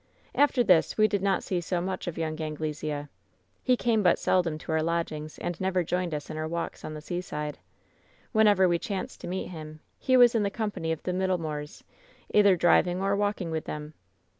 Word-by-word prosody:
"After 280 -3 +3
this 180 -7 +3
we 215 0 +5
did 200 -2 -1
not 195 -1 +1
see 180 -2 -1
so 175 +1 -1
much 185 +1 -4
of 170 - -4
young 160 -1 -3
Angle 155 0 -3
sea. 150 -1 -4 0.6
"He 255 -1 +3
came 230 -3 +2
but 180 -3 +4
seldom 170 -4 +1
to 155 - -7
our 160 0 +2
lodgings, 155 -2 -2
and 175 0 -4
never 185 -1 +1
joined 175 -1 -1
us 145 - -5
in 155 - -5
our 155 0 -2
walks 170 +1 -4
on 155 - -6
the 150 - -7
seaside. 150 -3 -4 0.7
Whenever 210 -4 +5
we 170 -1 +2
chanced 195 0 -5
to - - -6
meet 185 +2 -3
him, 155 -3 -9 0.2
he 260 -1 +3
was 245 -1 +7
in 225 - +2
the 200 - +1
company 205 -6 -3
of 160 - -3
the 180 - -2
Middlemoors, 165 -6 -2 0.5
either 205 -2 +6
driving 175 +1 +3
or 195 +1 +1
walking 205 -4 -1
with 160 -1 -3
them. 150 0 -6
175 Hz, 205 wpm, -28 LUFS, 155-195 Hz, 0.7 s, was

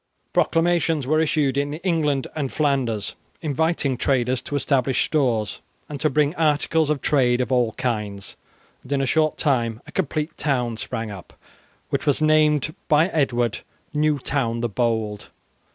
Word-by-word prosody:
Proclamations 165 -3 +2
were 155 +4 +2
issued 145 -4 +1
in 145 +1 -2
England 155 -6 0
and 140 -4 -2
Flanders 135 -8 0 0.3
inviting 155 -3 0
traders 130 -1 +1
to 145 - -5
establish 135 -2 +1
stores 120 - 0 0.3
and 145 -2 -6
to 155 - +2
bring 150 +1 +2
articles 155 -1 +1
of 150 -3 -1
trade 125 -4 +3
of 125 - -1
all 120 -3 +2
kinds, 105 -5 -3 0.5
and 135 - -5
in 140 - +1
a - - +1
short 155 +3 +1
time 120 -7 0
a - - -12
complete 155 -3 -2
town 125 -5 0
sprang 115 -2 -4
up 95 -3 -10 0.6
which - - -2
was 145 - +3
named 155 -1 +3
by 155 +4 +4
Edward 120 - 0 0.3
"New 150 0 +2
Town 125 -4 -1
the 120 - -1
Bold". 110 -2 -1
140 Hz, 150 wpm, -23 LUFS, 120-155 Hz, 0.6 s, by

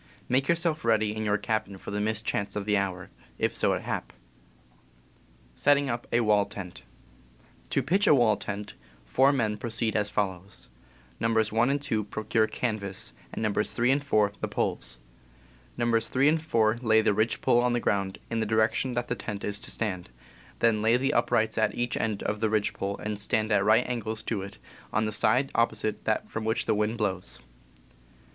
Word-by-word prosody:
"Make 135 +2 +1
yourself 170 -2 +1
ready 110 -2 +2
in 110 - -3
your 105 0 +2
cabin 110 -3 -2
for - - -8
the 105 0 -1
mischance 105 -1 -1
of 105 -1 -3
the 105 0 +2
hour, 95 -2 -2 0.3
if - - 0
so - - +2
it - - -3
hap." - - -4 1.4
Setting 140 - +3
up 120 0 -4
a - - +3 1.5
To 135 - +1
pitch 190 - +2
a - - +7
wall 120 -5 +4
tent, 105 0 -6 0.3
four 130 - +4
men 110 -6 0
pro 105 - -5
Wall - - -5
Tent. - - -5
ceed 110 -1 0
as 105 -1 +1
follows: 95 -2 -4 0.5
Nos. 115 -1 +1
1 115 +4 +3
and 140 +1 +1
2 110 -7 -2
procure 110 +1 0
canvas, 100 -6 -3 0.2
and - - -4
Nos. 105 0 0
3 120 +2 +2
and 140 +1 +1
4 105 -7 +2
the - - -1
poles. 60 - -2 0.8
Nos. 115 -1 +1
3 135 +3 +3
and 160 +1 +1
4 115 -7 +1
lay 110 -2 +4
the 105 - +2
ridge 110 +2 +1
pole 120 - +3
on 125 0 +1
the 120 - +1
ground, 100 -4 -1
in 115 - 0
the 110 - 0
direction 110 +3 +1
that 120 0 -1
the - - -1
tent 105 -4 -6
is 105 0 -3
to - - -6
stand; 95 - -3 0.5
then 115 -2 +2
lay 115 +2 +4
the 135 +3 0
up - - +2
rights 110 0 +1
at 110 - +1
each 120 0 -1
end 110 -3 -2
of 105 0 -2
ridge 110 -2 +1
pole 100 0 -3
and 105 -1 -3 0.3
at 100 -2 +3
right 110 +4 +4
angles 110 -3 -3
to 110 -4 -2
it, 100 +1 -8 0.3
on 110 +1 +1
the 110 - -2
side 125 +6 +2
opposite 110 -2 0
that 110 - 0
from 110 - -5
which 110 +1 0
the - - +2
wind 105 +2 0
blows. 95 - -3
110 Hz, 195 wpm, -27 LUFS, 105-120 Hz, 1.5 s, a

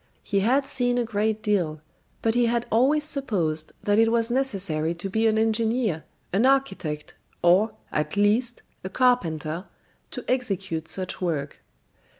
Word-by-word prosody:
He 200 - 0
had 260 +7 +2
seen 245 -2 0
a 245 - +2
great 220 -1 -1
deal; 175 -7 0 0.4
but 225 - +2
he 240 0 +3
had 235 0 0
always 275 +7 +3
supposed 185 - -1
that 205 +1 +2
it 225 0 +4
was 230 0 +1
necessary 190 -11 0
to 175 +3 -5
be 220 +2 +2
an 220 0 +2
engineer, 220 -5 +1 0.3
an 200 +5 +3
architect, 195 - 0 0.3
or, 195 +6 +4 0.2
at 150 +6 -2
least, 225 +4 +2 0.2
a 190 - -4
carpenter, 175 -9 +1 0.4
to - - -7
execute 195 -10 -2
such 185 -1 -4
work. 150 -5 -2
215 Hz, 150 wpm, -25 LUFS, 175-240 Hz, 0.4 s, it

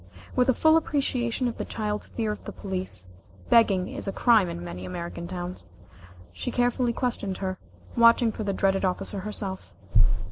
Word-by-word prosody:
With 250 0 +3
a 260 - +4
full 315 0 +5
appreciation 255 -5 0
of 235 - -4
the - - -1
child's 210 -1 -3
fear 220 -2 -2
of 210 - -6
the - - -5
police, 185 - -5 0.5
begging 195 -5 +5
is - - -6
a - - 0
crime 220 -4 +4
in 85 - -6
many 90 +1 -6
American 170 - -5
towns 180 - -6 0.6
she 90 0 -4
carefully 245 0 +1
questioned 230 -6 -2
her, 185 -1 -3 0.4
watching 235 0 +6
for 220 - -5
the 200 - 0
dreaded 195 0 +1
officer 190 +2 0
herself. 195 - -5
205 Hz, 170 wpm, -26 LUFS, 185-235 Hz, 0.6 s, watching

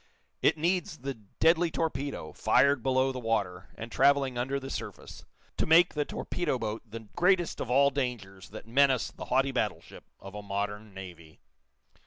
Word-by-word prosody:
It - - +3
needs 170 0 0
the 135 +1 -4
deadly 160 - +1
torpedo, 140 - -3
fired 140 0 +3
below 130 +2 +2
the 130 - -5
water, 100 -6 -2
and 115 +1 -8
traveling 135 -1 +3
under 130 +3 -1
the 135 0 -7
surface, - - -7 0.3
to - - 0
make 170 +2 +6
the 150 -1 -1
torpedo 160 -7 -2
boat 110 -1 -4
the 115 +2 -7
greatest 175 -1 +2
of 120 - -4
all 140 +3 +4
dangers 120 -9 -4
that 110 - -10
menace 135 0 +3
the - - -9
haughty 135 +2 +2
battleship 115 -5 -4
of 95 0 -11
a 105 - -6
modern 105 +1 -4
navy. 85 -4 -11
130 Hz, 165 wpm, -29 LUFS, 105-140 Hz, 0.3 s, make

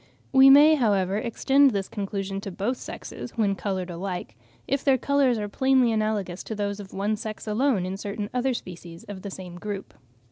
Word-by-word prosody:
We 265 0 +8
may, 295 +3 +8
however, 200 -8 +2
extend 270 +5 +3
this 200 -5 -2
conclusion 195 -1 -4
to 200 - -6
both 210 +8 -2
sexes, 240 - -8
when 205 -3 +2
coloured 190 -2 -3
alike, 175 - -5 0.3
if 275 0 0
their 270 -2 +4
colours 275 -2 +2
are 210 -1 -3
plainly 260 +2 +3
analogous 215 -4 -1
to 220 - -5
those 205 0 -3
of 195 -2 -9
one 205 +2 -1
sex 215 0 -7
alone 220 -2 +1
in 190 +1 -4
certain 205 0 -4
other 250 0 0
species 170 -4 -9
of 200 -2 -8
the 200 - -6
same 180 -2 -9
group. 205 -1 -6
205 Hz, 185 wpm, -25 LUFS, 195-250 Hz, 0.3 s, We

